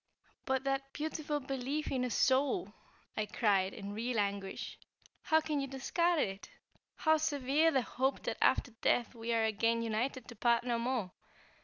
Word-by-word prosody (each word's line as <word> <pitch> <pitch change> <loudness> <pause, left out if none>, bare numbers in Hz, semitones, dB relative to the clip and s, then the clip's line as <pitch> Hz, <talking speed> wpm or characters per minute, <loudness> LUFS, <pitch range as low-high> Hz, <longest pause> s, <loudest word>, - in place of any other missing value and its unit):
"But 265 -1 0
that 275 0 -2
beautiful 300 -1 -2
belief 270 +2 -3
in 255 -2 0
a 250 - 0
soul," 275 - +2 0.4
I 215 -1 -1
cried, 195 -5 +2
in 200 0 -7
real 230 +2 -1
anguish, 200 -1 -3 0.4
"How 315 0 +3
can 305 -2 -1
you 275 - -2
discard 335 +6 +1
it? 195 -8 -2 0.5
How 315 0 +3
sever 295 +1 +2
the 265 -6 +2
hope 265 +4 -1
that - - -2
after 250 - +3
death, 245 0 +2
we 230 0 -4
are 225 -1 +2
again 230 +2 +1
united 235 +4 -2
to 240 - -9
part 235 +2 +3
no 240 -1 0
more? 235 -6 -1
255 Hz, 165 wpm, -33 LUFS, 225-285 Hz, 0.5 s, How